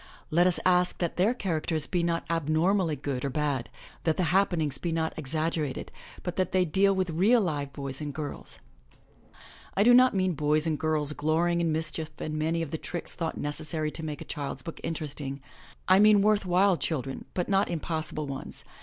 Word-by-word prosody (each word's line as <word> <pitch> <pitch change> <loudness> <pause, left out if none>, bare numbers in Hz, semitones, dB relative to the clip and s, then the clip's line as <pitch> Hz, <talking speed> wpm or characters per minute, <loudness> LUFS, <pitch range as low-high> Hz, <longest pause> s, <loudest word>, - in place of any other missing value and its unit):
Let 175 +3 +4
us 180 - +2
ask 180 0 +3
that 170 -2 -2
their 205 +7 +3
characters 160 -6 -1
be 180 - 0
not 170 0 -1
abnormally 165 +2 +1
good 135 -2 -4
or 140 - 0
bad, 140 -3 -1 0.3
that 160 -2 +1
the 185 - +1
happen 190 -3 +3
ings 150 -3 -2
be 170 - -2
not 160 0 -1
exaggerated, 155 -1 -2 0.3
but 180 -1 -4
that 185 -1 0
they 185 -1 +3
deal 195 +4 +3
with 185 -2 0
real 200 +10 +4
live 145 -8 -2
boys 140 0 -3
and 150 -1 -3
girls. 145 0 -5 1.2
I 200 - +5
do 245 +2 +7
not 255 -2 +6
mean 185 -1 +1
boys 150 +1 +2
and 155 -3 0
girls 155 -2 0
glorying 170 +3 +1
in 165 -1 +1
mischief 155 0 -1
and 155 - -4
many 160 +2 0
of 155 - -6
the 160 - -3
tricks 175 - -4
thought 165 -2 -3
necessary 155 +1 -2
to 160 - -4
make 150 -2 -5
a - - -7
child's 140 -2 -5
book 165 - -7
208 - - -12
THE - - -4
LATCH 165 - -2 0.2
KEY 150 - -4
interesting; 135 +1 -6 0.5
I 185 +1 +6
mean 210 -1 +6
worth 210 -2 +2
while 185 +1 +4
children, 135 -3 -3
but 180 - -1
not 195 0 +2
impossible 155 -2 -3
ones. 135 -1 -7
160 Hz, 205 wpm, -28 LUFS, 150-180 Hz, 1.2 s, do